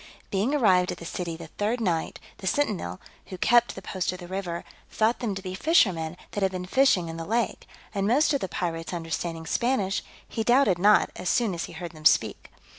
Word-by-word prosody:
Being 210 +9 +1
arrived 185 -9 +4
at - - -5
the 170 - -9
city 170 -1 -4
the 165 - -8
third 210 +8 -2
night, 175 -7 -1 0.2
the 190 - -6
sentinel, 185 - -1 0.3
who 185 - -7
kept 240 +5 +3
the 190 - -9
post 185 -2 -2
of 185 - -6
the 175 -1 -10
river, 180 -2 -4 0.3
thought 225 +2 +1
them 220 -5 -2
to 190 - -6
be 185 -1 -5
fishermen 185 - +2
that 205 - -3
had 190 -1 +2
been 180 -1 -4
fishing 190 -5 +3
in 165 0 -6
the 165 - -4
lake: 225 +6 -1 0.3
and 200 -1 0
most 285 +7 +3
of 280 - 0
the 190 - -3
pirates 165 0 -3
understanding 165 0 -4
Spanish, 210 -3 0 0.3
he 225 - -3
doubted 240 -6 +4
not, 210 +3 +5
as 180 - -2
soon 230 -6 +2
as 170 - -3
he - - -11
heard 175 -2 -6
them 155 -2 -14
speak. - - +3
190 Hz, 215 wpm, -26 LUFS, 170-225 Hz, 0.3 s, not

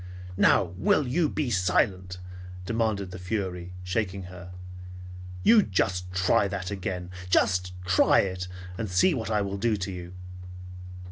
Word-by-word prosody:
"Now 95 - +5
will 140 +9 +3
you 155 +4 +1
be 145 -5 -2
silent?" 90 -1 +1 0.5
demanded 110 -4 -1
the 90 - -7
fury, 90 -2 -3
shaking 95 +1 -2
her. 90 0 -10 0.9
"You 225 -1 +7
just 90 - -1
try 90 +2 +2
that 95 -1 -4
again! 90 -2 -4 0.2
Just 90 -1 +2
try 90 0 +5
it, 90 -1 -3 0.3
and 110 -3 -2
see 100 - +4
what 115 -6 -3
I 105 -2 +1
will 100 0 -3
do 110 0 +1
to 95 0 -4
you." 90 -1 -8
95 Hz, 140 wpm, -27 LUFS, 90-105 Hz, 0.9 s, You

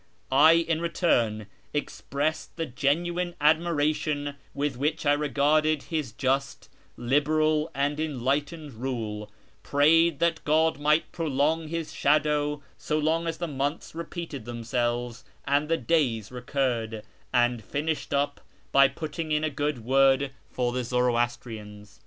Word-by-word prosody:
I, 150 +5 +7
in 165 -1 +1
return, 120 - +1 0.3
expressed 150 +2 -3
the 165 - -1
genuine 170 +6 -1
admiration 150 -2 +1 0.2
with 145 -1 -1
which 150 +5 -1
I 145 - +5
regarded 150 +1 +2
his 155 -7 -3
just, 135 +3 -2 0.3
liberal, 150 +4 +2
and 145 +2 0
enlightened 145 +1 -2
rule; 110 -4 -4 0.3
prayed 160 +2 +4
that 170 +1 0
God 155 -1 +2
might 150 +2 +2
prolong 155 +1 0
his 165 0 -4
shadow 150 0 +1 0.2
so 150 - -1
long 160 +2 +1
as 165 - -2
the 175 - -3
months 145 +1 -3
repeated 165 -6 -6
themselves 120 +1 -2 0.2
and 145 +2 +1
the 165 - +2
days 130 -13 0
recurred; 120 -4 -2 0.3
and 120 -2 +2
finished 150 +7 -3
up 145 0 0 0.3
by 140 0 +7
putting 155 +3 -5
in 150 0 +1
a 155 - 0
good 145 -4 -2
word 135 +1 +4 0.2
for 125 -1 -1
the 125 +1 -2
Zoroastrians. 120 -4 -2
145 Hz, 130 wpm, -27 LUFS, 125-155 Hz, 0.3 s, I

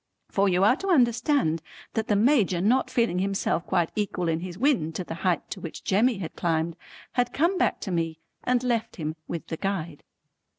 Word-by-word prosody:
For 200 0 +2
you 180 +1 +2
are 215 +5 +6
to 390 - -5
understand 245 - +3 0.3
that 220 -1 -1
the 210 - +2
Major 210 -5 +3
not 235 +8 +2
feeling 230 -8 +1
himself 195 -3 0
quite 170 -2 +1
equal 195 -4 -1
in 160 0 0
his 180 0 -7
wind 210 - +1
to 185 - -2
the 165 - -6
height 180 -3 +1
to - - -5
which 165 - -7
Jemmy 220 +4 +2
had 175 -4 -6
climbed, 165 -1 0 0.4
had 245 -1 +1
come 340 +6 +2
back - - +1
to 195 - -4
me 165 -2 -1 0.3
and 250 0 +1
left 235 -3 -1
him 155 -2 -4
with 170 - -4
the 160 - -5
Guide. 170 -6 -3
195 Hz, 200 wpm, -26 LUFS, 170-240 Hz, 0.4 s, are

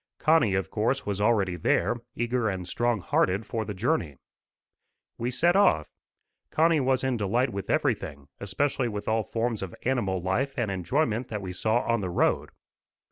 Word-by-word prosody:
Connie, 155 -11 +3
of 95 - -2
course, 120 +5 0
was 100 -1 -2
already 105 -5 +2
there, 85 - +1 0.2
eager 120 -1 0
and 95 -2 -4
strong 120 +2 0
hearted 95 +4 +1
for 110 +1 -3
the 105 -1 -5
journey. 95 - -1 1.0
We 120 - -1
set 170 +8 +2
off. 190 - +3 0.6
Connie 165 0 +3
was 130 -1 +1
in 130 -2 0
delight 120 +5 +1
with 100 -1 -5
everything, 95 - -1
especially 125 +6 -1
with 105 -3 -5
all 110 +1 +2
forms 115 0 -2
of 95 -2 -6
animal 115 -8 0
life 110 +10 -1
and 105 - 0
enjoyment 115 - 0
that 105 -3 -5
we 90 -1 -5
saw 110 +6 +1
on 115 -2 0
the 95 - -3
road. 90 - +1
110 Hz, 170 wpm, -27 LUFS, 95-125 Hz, 1.0 s, Connie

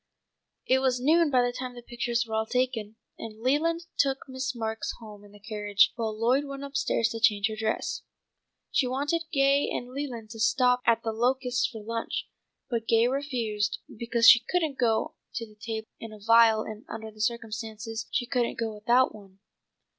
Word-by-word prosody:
It 260 - +3
was 260 -2 +1
noon 315 +5 +4
by 255 -3 +3
the 245 - 0
time 250 0 -6
the 240 - -10
pictures 240 0 -1
were 220 - -8
all 220 0 0
taken, 245 -4 -1 0.2
and 220 -1 -8
Leland 330 +6 +1
took 270 0 +1
Miss 260 -1 -4
Marks 225 -1 -3
home 210 -3 -11
in 205 - -16
the 205 - -16
carriage 205 -1 +2
while 220 -2 -3
Lloyd 255 +5 +2
went 275 0 -7
up 280 0 -8
stairs 235 -4 +1
to 225 - -5
change 210 -1 +3
her 220 - -4
dress. 220 0 -2 0.7
She 260 - +2
wanted 290 +6 -1
Gay 275 0 +3
and 245 +1 -4
Leland 245 -6 -5
to 225 - -9
stop 250 +2 +3
at 230 -1 +3
The 225 - -1
Locusts 250 +2 +1
for 220 -4 -9
lunch, 230 +1 -3 0.4
but 230 -3 -3
Gay 230 +1 +4
refused 235 -6 -1 0.2
because 235 0 +2
she 245 - +10
couldn't 320 -6 0
go 225 -3 +1 0.2
to 230 - -3
the 215 - -18
table 220 +1 -6
in 225 - -8
a 215 - -10
veil 225 +1 +5
and 215 0 -8
under 220 -1 -6
the 215 0 -10
circumstances 225 0 -3
she 250 - -1
couldn't 240 -1 -1
go 225 -1 -2
without 235 +5 +3
one. 195 -3 -15
235 Hz, 190 wpm, -27 LUFS, 220-260 Hz, 0.7 s, she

